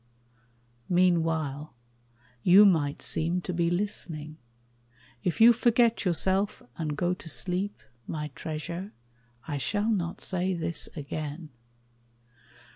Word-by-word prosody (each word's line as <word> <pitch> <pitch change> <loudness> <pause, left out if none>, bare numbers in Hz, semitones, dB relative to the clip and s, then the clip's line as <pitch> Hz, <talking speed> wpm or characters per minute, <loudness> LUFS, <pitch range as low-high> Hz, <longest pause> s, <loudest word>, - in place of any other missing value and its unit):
Meanwhile, 160 -6 +1 0.7
you 190 +7 +8
might 155 -7 +2
seem 170 +3 0
to 180 - -4
be 170 0 +1
listening: 170 -5 -3 0.9
If 175 - -1
you 235 +2 +9
forget 235 -1 +2
yourself 190 +3 +1
and 155 -3 -3
go 175 +2 +1
to 175 -2 -8
sleep, 180 - -2 0.2
My 150 -1 -4
treasure, 165 +7 -6 0.5
I 145 -2 -2
shall 210 - 0
not 175 -5 -1
say 185 0 -1
this 170 -2 -1
again. 150 +1 -5
175 Hz, 110 wpm, -28 LUFS, 155-190 Hz, 0.9 s, you